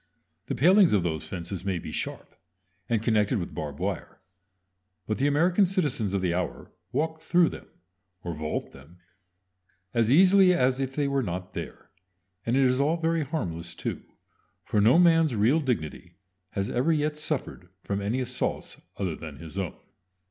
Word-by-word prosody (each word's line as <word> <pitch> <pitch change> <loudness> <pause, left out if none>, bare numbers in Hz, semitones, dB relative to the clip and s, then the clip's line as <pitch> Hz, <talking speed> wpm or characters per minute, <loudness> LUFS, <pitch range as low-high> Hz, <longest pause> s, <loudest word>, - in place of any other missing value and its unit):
The - - -2
palings 185 - +5
of 100 -4 +3
those 80 -3 -3
fences 90 0 -5
may 95 -2 -1
be - - -7
sharp, - - -5 0.6
and 110 -2 +1
connected 110 0 +2
with 90 -3 -4
barbed 75 -2 -5
wire; - - -4 0.9
but 110 - -2
the 140 - +3
American 175 +7 +3
citizens 145 - -1
of 95 - 0
the 90 -2 0
hour 90 0 -4 0.2
walk 160 +4 -1
through 170 +1 +3
them, - - -10 0.6
or 85 - -3
vault 75 0 -4
them, 75 +6 -16 1.0
as 115 -1 +2
easily 185 +3 +6
as 130 -4 +2
if 135 -1 -3
they 145 -2 +1
were 140 -1 +1
not 90 -4 -5
there. - - -8 0.6
And 120 - +2
it 135 - +4
is 130 +1 +3
all 155 +4 +2
very 165 0 0
harmless 85 - -4
too; - - -4 0.6
for 105 - +1
no 115 +9 +6
man's 165 -6 +4
real 115 +9 +3
dignity 90 - -3 0.4
has 100 0 -1
ever 130 +7 +1
yet 150 -1 +1
suffered 150 - -3
from 100 0 -2
any 110 +6 -1
assaults 125 0 -3 0.2
other 90 -5 -2
than 80 -2 -9
his 80 +1 -10
own. 95 -4 -3
120 Hz, 170 wpm, -27 LUFS, -, 1.0 s, easily